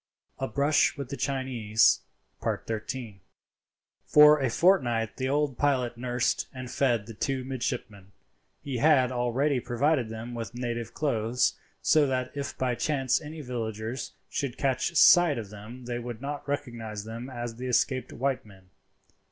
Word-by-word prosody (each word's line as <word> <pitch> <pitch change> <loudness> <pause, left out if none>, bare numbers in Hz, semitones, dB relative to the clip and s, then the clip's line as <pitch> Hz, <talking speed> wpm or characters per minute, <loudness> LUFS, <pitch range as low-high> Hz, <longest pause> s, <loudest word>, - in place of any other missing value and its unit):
A 135 - -1
BRUSH 145 +3 +2
WITH 140 -3 -5
THE 140 - -4
CHINESE.—XIII. 115 -2 -1 0.9
For 150 0 +8
a 135 -3 +1
fortnight 120 - +2
the 130 0 -1
old 145 -2 0
pilot 130 -4 +1
nursed 125 0 -1
and 130 -2 -7
fed 120 -6 +1
the 115 - -9
two 130 +4 -2
midshipmen. 110 -6 -4 0.5
He 135 -3 -3
had 135 -2 +4
already 125 +3 +1
provided 125 +1 +1
them 110 +2 -6
with 115 0 -6
native 120 -2 -4
clothes, 120 -4 +1 0.3
so 155 -2 +4
that 130 -1 -1
if 140 -1 -4
by 130 -1 0
chance 135 0 0
any 155 +1 -8
villagers 115 -1 -4
should 135 -4 -3
catch 135 +5 0
sight 170 -2 +7
of 105 -3 -6
them 110 +5 -10
they 120 0 -3
would 120 -2 -6
not 145 +2 -5
recognize 115 -7 -4
them 115 +4 -7
as 120 -2 -5
the 130 +1 -5
escaped 130 +1 +1
white 135 +1 -1
men. 95 -3 -18
125 Hz, 145 wpm, -28 LUFS, 115-140 Hz, 0.9 s, For